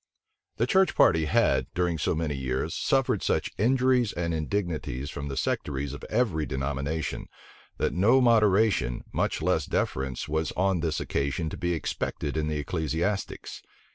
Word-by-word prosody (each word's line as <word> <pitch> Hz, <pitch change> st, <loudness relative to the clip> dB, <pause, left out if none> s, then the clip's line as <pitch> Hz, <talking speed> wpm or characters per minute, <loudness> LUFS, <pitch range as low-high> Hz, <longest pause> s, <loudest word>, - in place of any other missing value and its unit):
The -, -, +2 dB
church 190 Hz, -2 st, +3 dB
party 80 Hz, -3 st, +4 dB
had, 75 Hz, -, +2 dB
during 90 Hz, -2 st, 0 dB
so -, -, 0 dB
many 80 Hz, -2 st, -1 dB
years, 65 Hz, -1 st, -2 dB
suffered -, -, +1 dB
such -, -, 0 dB
injuries 125 Hz, 0 st, +3 dB
and 85 Hz, -1 st, -2 dB
indignities 80 Hz, -5 st, -2 dB
from 70 Hz, -, -5 dB
the 70 Hz, -1 st, -5 dB
sectaries 70 Hz, 0 st, -2 dB
of 70 Hz, -, -9 dB
every 100 Hz, -, 0 dB
denomination, 70 Hz, +4 st, -3 dB, 0.5 s
that -, -, 0 dB
no 110 Hz, +9 st, +4 dB
moderation, 105 Hz, -, +3 dB
much -, -, -1 dB
less -, -, +1 dB
deference, 65 Hz, -1 st, -2 dB
was 80 Hz, +1 st, -1 dB
on 95 Hz, -1 st, +1 dB
this 80 Hz, -3 st, -1 dB
occasion 70 Hz, +3 st, -2 dB
to -, -, -5 dB
be 85 Hz, -2 st, -1 dB
expected 75 Hz, -2 st, -3 dB
in 80 Hz, -1 st, 0 dB
the 75 Hz, -1 st, -1 dB
ecclesiastics. 80 Hz, +7 st, -2 dB
80 Hz, 150 wpm, -27 LUFS, 70-100 Hz, 0.5 s, party